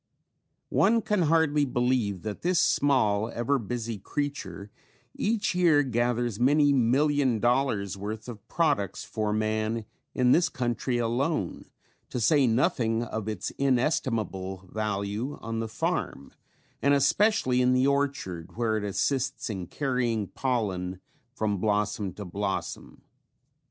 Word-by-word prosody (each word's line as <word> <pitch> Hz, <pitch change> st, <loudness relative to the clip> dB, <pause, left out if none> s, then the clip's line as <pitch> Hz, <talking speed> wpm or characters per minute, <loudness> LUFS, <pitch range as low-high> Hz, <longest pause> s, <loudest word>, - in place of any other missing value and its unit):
One 225 Hz, +2 st, +3 dB
can 210 Hz, -3 st, +1 dB
hardly 160 Hz, -2 st, +3 dB
believe 125 Hz, -7 st, 0 dB
that 105 Hz, -1 st, -5 dB
this 180 Hz, +1 st, +1 dB
small, 115 Hz, -9 st, +2 dB
ever 120 Hz, +4 st, 0 dB
busy 115 Hz, -1 st, -4 dB
creature 105 Hz, -, -4 dB, 0.4 s
each 215 Hz, -2 st, 0 dB
year 170 Hz, -5 st, +4 dB
gathers 120 Hz, -3 st, 0 dB
many 145 Hz, +3 st, +4 dB
million 135 Hz, 0 st, +2 dB
dollars 120 Hz, -5 st, +1 dB
worth 110 Hz, +3 st, -5 dB
of 110 Hz, -5 st, -9 dB
products 145 Hz, -, 0 dB
for 110 Hz, -2 st, -2 dB
man 110 Hz, +1 st, -1 dB, 0.3 s
in 125 Hz, -1 st, +3 dB
this 170 Hz, +4 st, +4 dB
country 120 Hz, 0 st, -1 dB
alone 120 Hz, -, -1 dB, 0.4 s
to 125 Hz, -, -3 dB
say 140 Hz, +3 st, +4 dB
nothing 115 Hz, -1 st, +1 dB
of 110 Hz, -2 st, -5 dB
its 105 Hz, -4 st, -3 dB
inestimable 115 Hz, -, 0 dB
value 105 Hz, +4 st, -2 dB
on 115 Hz, 0 st, -4 dB
the 115 Hz, -, -2 dB
farm 110 Hz, -9 st, -3 dB, 0.5 s
and 140 Hz, 0 st, +4 dB
especially 140 Hz, -, +3 dB
in 125 Hz, 0 st, +3 dB
the 130 Hz, +1 st, +3 dB
orchard, 140 Hz, -, -1 dB
where 110 Hz, -2 st, +1 dB
it 105 Hz, -, -3 dB
assists 130 Hz, +5 st, -1 dB
in 95 Hz, -4 st, -5 dB
carrying 120 Hz, -7 st, -1 dB
pollen 95 Hz, -8 st, -2 dB, 0.4 s
from 105 Hz, -3 st, -1 dB
blossom 105 Hz, -1 st, 0 dB
to 105 Hz, +2 st, -8 dB
blossom. 100 Hz, +2 st, -4 dB
120 Hz, 125 wpm, -27 LUFS, 105-140 Hz, 0.5 s, year